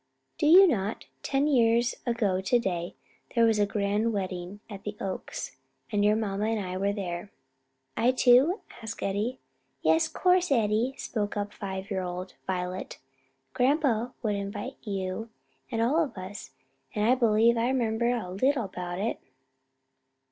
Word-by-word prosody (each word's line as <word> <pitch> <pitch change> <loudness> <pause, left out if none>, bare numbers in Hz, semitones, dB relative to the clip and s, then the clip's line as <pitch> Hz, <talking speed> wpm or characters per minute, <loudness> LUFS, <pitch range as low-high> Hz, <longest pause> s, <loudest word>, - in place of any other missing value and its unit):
"Do - - +2
you 370 +5 +9
not? 215 - -1 0.2
Ten 275 0 +1
years 235 -4 +3
ago 210 -6 +1
to 220 +6 +3
day 175 -6 -2 0.4
there 230 -1 +5
was 225 -2 +3
a 205 - +3
grand 205 +2 0
wedding 185 -1 -4
at 200 -3 -9
the 210 0 -5
Oaks, 190 -1 -5 0.3
and 205 -1 +2
your 210 +1 +4
mamma 210 -2 -1
and 225 0 0
I 185 -2 -4
were 200 +2 +1
there." 185 -2 -4 0.7
"I 240 - +3
too?" 260 - +4 0.2
asked 225 0 -6
Eddie. 210 +6 -1 0.5
"Yes, 160 +1 +4
course, 365 -2 +2
Eddie," 230 +1 +2
spoke 210 -2 -3
up 205 0 -3
five 190 0 -6
year 190 -1 0
old 180 +1 -5
Violet, 185 0 -3 0.6
"grandpa 250 -3 +2
would 200 -2 -1
'vite 225 +7 -6
you 195 +1 -4 0.4
and 230 -3 0
all 300 +8 +3
of 280 - -6
us; 185 +2 -7 0.5
and 210 0 +1
I 245 - +6
b'lieve 230 -2 +4
I 235 +2 +1
'member 235 -2 +1
a 230 -7 -2
little 255 +7 +1
about 180 -2 -5
it." 210 +4 -2
215 Hz, 155 wpm, -28 LUFS, 195-240 Hz, 0.7 s, you